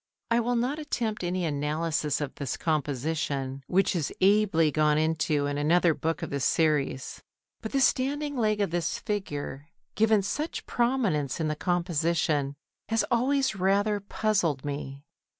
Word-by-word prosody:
I 230 Hz, -, +4 dB
will 240 Hz, +1 st, 0 dB
not 255 Hz, +6 st, 0 dB
attempt 230 Hz, -9 st, -2 dB
any 180 Hz, 0 st, -1 dB
analysis 150 Hz, 0 st, -1 dB
of 145 Hz, -2 st, -3 dB
this 140 Hz, -4 st, -4 dB
composition, 140 Hz, -2 st, -2 dB
which 190 Hz, +1 st, +2 dB
is 160 Hz, -5 st, -1 dB
ably 190 Hz, -5 st, +4 dB
gone 150 Hz, 0 st, +3 dB
into 155 Hz, -2 st, +1 dB
in 145 Hz, 0 st, -2 dB
another 170 Hz, +3 st, +3 dB
book 165 Hz, +2 st, -2 dB
of -, -, -5 dB
this 140 Hz, -1 st, -2 dB
series. 150 Hz, -5 st, 0 dB, 0.4 s
But 220 Hz, -, -5 dB
the 275 Hz, -, +1 dB
standing 285 Hz, +3 st, +1 dB
leg 215 Hz, -4 st, +1 dB
of 200 Hz, -, 0 dB
this 170 Hz, -2 st, -1 dB
figure, 145 Hz, -8 st, -4 dB, 0.3 s
given 215 Hz, -2 st, +3 dB
such 300 Hz, -, -3 dB
prominence 225 Hz, -, 0 dB
in 155 Hz, -1 st, 0 dB
the 155 Hz, -, -1 dB
composition, 165 Hz, -5 st, 0 dB, 0.3 s
has 225 Hz, 0 st, +2 dB
always 265 Hz, +1 st, +2 dB
rather 200 Hz, +2 st, +2 dB
puzzled 195 Hz, -9 st, 0 dB
me. 140 Hz, -1 st, -5 dB
170 Hz, 150 wpm, -27 LUFS, 150-215 Hz, 0.4 s, I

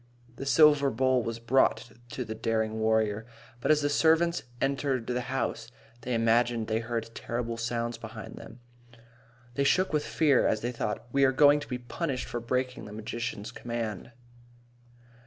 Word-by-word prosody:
The 135 Hz, -, -5 dB
silver 145 Hz, -1 st, +6 dB
bowl 130 Hz, +1 st, +2 dB
was 115 Hz, 0 st, -4 dB
brought 115 Hz, -1 st, +2 dB, 0.2 s
to 125 Hz, -, -3 dB
the 110 Hz, -, -5 dB
daring 110 Hz, 0 st, -1 dB
warrior. 110 Hz, 0 st, +1 dB, 0.3 s
But -, -, -2 dB
as 155 Hz, -1 st, +5 dB
the -, -, +3 dB
servants 165 Hz, +3 st, +3 dB, 0.2 s
entered 135 Hz, -3 st, 0 dB
the 125 Hz, +1 st, -1 dB
house, 125 Hz, -3 st, -3 dB, 0.3 s
they 125 Hz, 0 st, -2 dB
imagined 115 Hz, 0 st, +2 dB
they 110 Hz, +1 st, 0 dB
heard 115 Hz, -1 st, -4 dB
terrible 115 Hz, 0 st, -3 dB
sounds 115 Hz, 0 st, -2 dB
about 115 Hz, -1 st, -9 dB
them. 120 Hz, -, -12 dB, 0.9 s
They 140 Hz, -, 0 dB
shook 185 Hz, +5 st, +2 dB
with 150 Hz, -1 st, +1 dB
fear 145 Hz, -5 st, +3 dB
as 110 Hz, -, 0 dB
they 120 Hz, -, -2 dB
thought, 110 Hz, -2 st, -3 dB
"We 140 Hz, +2 st, +3 dB
are 135 Hz, -, +5 dB
going 145 Hz, +2 st, +6 dB
to 145 Hz, -, -9 dB
be 125 Hz, -, -2 dB
punished 130 Hz, +2 st, -3 dB
for 120 Hz, -, -3 dB
breaking 125 Hz, +2 st, -2 dB
the 105 Hz, -, -9 dB
magician's 110 Hz, 0 st, -5 dB
command." 115 Hz, -3 st, -5 dB
120 Hz, 165 wpm, -28 LUFS, 115-135 Hz, 0.9 s, silver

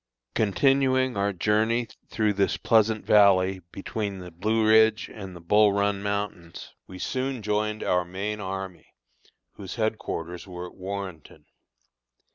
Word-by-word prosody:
Continuing 130 Hz, +3 st, +2 dB
our 100 Hz, 0 st, +1 dB
journey 110 Hz, +5 st, +1 dB, 0.2 s
through 110 Hz, -2 st, +1 dB
this 100 Hz, 0 st, +1 dB
pleasant 110 Hz, -1 st, +2 dB
valley 95 Hz, -2 st, +4 dB
between 100 Hz, 0 st, -4 dB
the 90 Hz, -1 st, -9 dB
Blue 110 Hz, +6 st, 0 dB
Ridge 110 Hz, 0 st, +4 dB
and 95 Hz, -4 st, -8 dB
the -, -, -9 dB
Bull 105 Hz, +4 st, +4 dB
Run 100 Hz, 0 st, 0 dB
mountains, 100 Hz, -4 st, -4 dB
we 95 Hz, -, -10 dB
soon 130 Hz, +3 st, -3 dB
joined 105 Hz, +1 st, -1 dB
our 90 Hz, 0 st, +2 dB
main 100 Hz, +4 st, -4 dB
army, 95 Hz, -2 st, -6 dB, 0.6 s
whose 95 Hz, -3 st, -7 dB
headquarters 100 Hz, -6 st, -3 dB
were 90 Hz, -1 st, -7 dB
at 90 Hz, -, -11 dB
Warrenton. 95 Hz, -4 st, -7 dB
100 Hz, 130 wpm, -26 LUFS, 95-110 Hz, 0.6 s, valley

